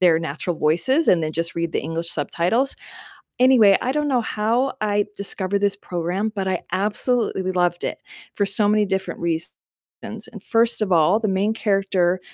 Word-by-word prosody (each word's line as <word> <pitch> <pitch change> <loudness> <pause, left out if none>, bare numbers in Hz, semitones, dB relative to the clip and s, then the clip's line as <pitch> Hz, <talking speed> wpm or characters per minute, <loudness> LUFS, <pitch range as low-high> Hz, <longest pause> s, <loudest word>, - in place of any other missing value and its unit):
their 170 -3 +5
natural 165 +2 -3
voices 175 - +2
and 175 - +5
then 155 0 -2
just 165 +1 -2
read 170 0 -2
the - - 0
English 165 +3 -3
subtitles. 175 - 0 0.6
Anyway, 245 -6 +6
I 255 - 0
don't 300 +1 -1
know 255 -3 +2
how 230 +5 0
I 205 -1 +1
discovered 200 0 -2
this 200 0 +1
program, 180 +3 -3
but 195 -2 -2
I 185 -2 0
absolutely 205 0 0
loved 175 -1 0
it - - -4 0.3
for 205 - +1
so 200 +1 +2
many 210 0 +3
different 190 -1 -3
reasons. 165 -1 -2 0.5
And - - -9
first 230 0 +2
of 195 - -3
all, 175 +5 +4
the 220 - -1
main 195 +3 +1
character, 195 -4 +1
195 Hz, 175 wpm, -22 LUFS, 175-215 Hz, 0.6 s, Anyway